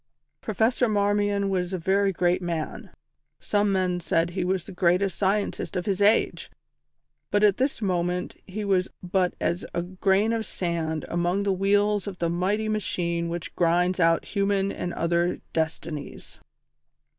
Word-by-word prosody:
Professor 230 +3 +1
Marmion 205 -1 +1
was 180 -1 -1
a - - 0
very 195 +3 +2
great 180 0 +1
man 170 -3 -4 0.5
some 205 -1 +1
men 185 -2 +1
said 170 0 0
he 185 0 -2
was 185 -1 -1
the - - -9
greatest 180 +2 +2
scientist 200 0 -1
of 180 - -2
his 195 -1 -1
age 210 +2 +2 0.8
but 205 0 +2
at 205 -2 +5
this 260 -3 -1
moment 180 -1 -1
he 205 +2 -4
was 190 -2 +1
but 180 0 0
as 170 +1 -1
a 170 - 0
grain 190 +4 +1
of 225 -1 -1
sand 165 -5 -2
among 175 +3 0
the 200 -1 +1
wheels 205 +2 +2
of 195 -2 -5
the 170 -1 0
mighty 195 +5 0
machine 170 -5 -1
which 170 -1 -5
grinds 180 +2 +2
out 165 -1 +3
human 200 -1 0
and 175 - -4
other 170 +1 0
destinies. 160 -2 -4
185 Hz, 155 wpm, -26 LUFS, 175-200 Hz, 0.8 s, at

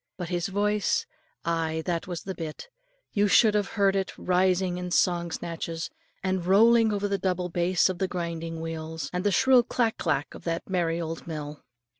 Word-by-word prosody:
But 175 -2 -5
his 175 -2 -1
voice 205 +1 +1 0.4
ay, 160 -1 -1
that 170 -2 -2
was 175 -2 -5
the 190 - -4
bit 165 - -7 0.4
you 205 0 +3
should 210 +3 +5
have 205 -1 0
heard 200 -1 +4
it 195 -1 -2
rising 185 0 +1
in 180 0 -4
song 175 -1 +2
snatches, 165 0 -4 0.3
and 185 -1 0
rolling 225 +5 +5
high 210 - 0
over 205 0 -1
the 200 -1 -1
double 180 -1 -1
bass 175 +1 +2
of 185 -2 -3
the 190 - +1
grinding 165 -2 -4
wheels 160 -2 -5
and 180 0 -1
the 205 - +3
shrill 255 +6 +5
clack 235 -1 0
clack 150 -3 -1
of - - -11
that 165 0 -2
merry 170 -3 0
old 165 0 -5
mill. 150 -2 -6
180 Hz, 190 wpm, -27 LUFS, 165-195 Hz, 0.4 s, should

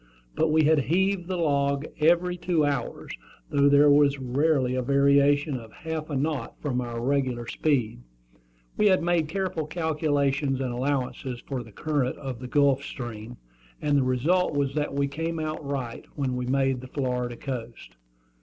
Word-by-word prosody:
But 160 - +1
we 155 0 +4
had 155 0 +4
heaved 190 +2 +1
the 185 -1 -2
log 140 -3 +1
every 175 +3 +3
two 175 -3 +1
hours, 140 -4 -3 0.4
though 140 0 +4
there 145 +1 +6
was 145 -1 +4
rarely 130 0 +1
a 130 - 0
variation 140 +1 +3
of 115 -2 -13
half 160 -1 -5
a 145 - -3
knot 140 -3 -2
from 130 -4 -1
our 120 -1 -4
regular 130 -2 0
speed. 120 - -1 0.8
We 210 - +4
had 185 -3 +3
made 170 -2 +1
careful 175 -2 -2
calculations 145 -4 0
and 130 -2 -2
allowances 130 -1 -2
for 135 -3 -3
the 115 -2 -12
current 145 +1 -1
of 130 -4 -6
the 125 - -7
Gulf 140 0 +3
Stream, 120 -3 -7 0.4
and 145 -1 +1
the 140 - +4
result 145 +7 +1
was 140 -1 0
that 150 -1 -2
we 140 0 +1
came 165 +3 -3
out 155 0 -4
right 135 -4 -4
when 135 -3 -1
we 125 0 -3
made 135 -1 +1
the 130 - -9
Florida 125 -2 -2
coast. 120 - -7
140 Hz, 170 wpm, -26 LUFS, 130-155 Hz, 0.8 s, there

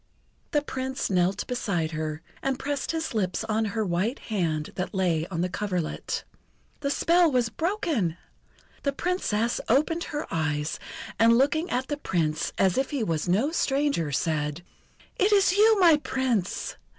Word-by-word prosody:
The 295 -3 +1
Prince 260 -4 -3
knelt 185 +2 +1
beside 195 -10 -1
her, 155 0 -4 0.2
and 270 -1 0
pressed 285 0 -3
his 325 -3 -2
lips 185 -3 -1
on 220 0 0
her 215 +1 -1
white 190 +8 0 0.2
hand 160 -6 -1
that 185 +2 -4
lay 170 -4 +1
on 170 -3 -3
the 180 - +1
coverlet. 180 -3 -3 0.6
The 280 - -1
spell 340 +3 +4
was 245 -3 +2
broken! 315 - -1 0.6
The 280 - 0
Princess 240 - 0
opened 310 +7 +2
her 300 0 -4
eyes, 155 -1 -1 0.4
and, 230 +1 +6
looking 315 +6 +2
at 255 +2 -1
the 290 - -2
Prince 160 - -1
as 190 +4 +3
if 265 - 0
he 280 -6 -1
was 165 -3 -1
no 220 - +2
stranger, 280 - +1
said: 150 +2 -1 0.6
"Is 395 +3 +4 0.2
it - - -1
you, 435 0 +6
my 335 -4 +7
Prince! 255 -9 -1
225 Hz, 155 wpm, -26 LUFS, 175-290 Hz, 0.6 s, my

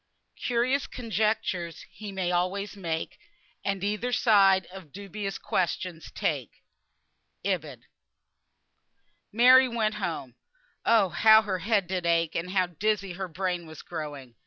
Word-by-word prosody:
"Curious 250 +3 +1
conjectures 210 -7 -2
he 210 -2 -8
may 190 -2 -1
always 185 +4 -1
make, 165 -5 -4 0.4
And 195 -1 -2
either 210 +4 -1
side 195 -6 +5
of 185 -6 -11
dubious 200 +1 -5
questions 175 -2 -2
take." - - -3 0.8
IB. - - -2 1.5
Mary 255 +3 +7
went 225 -3 0
home. 160 -9 -4 0.5
Oh! 220 -5 +5
how 220 +6 +6
her 190 -3 -2
head 200 +1 +1
did 180 -1 -2
ache, 165 -1 +2
and 170 +2 -3
how 185 -1 +2
dizzy 195 +2 -1
her 190 +1 -4
brain 180 0 -3
was 160 -2 -11
growing! 145 -7 -7
190 Hz, 125 wpm, -27 LUFS, 175-215 Hz, 1.5 s, Mary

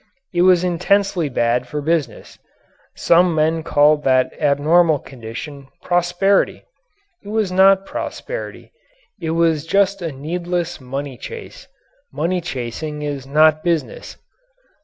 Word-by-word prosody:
It 175 - +1
was 180 -1 +5
intensely 180 -1 +1
bad 120 0 0
for 150 - -4
business. 155 0 -3 0.6
Some 175 0 +3
men 160 +1 +1
called 150 -1 +3
that 130 -1 +2
abnormal 155 +3 +3
condition 135 +3 -9 0.2
"prosperity." 175 +3 +1 0.6
It - - -14
was 210 -2 -1
not 190 +1 +4
prosperity - - -6 0.5
it 160 - -3
was 165 -3 +2
just 200 +1 +1
a 165 -2 -3
needless 170 +4 -4
money 135 0 -6
chase. - - -9 0.4
Money 170 +6 -1
chasing 150 0 -5
is 140 -2 -5
not 155 +2 +3
business. 175 - -3
160 Hz, 115 wpm, -19 LUFS, 145-180 Hz, 0.6 s, was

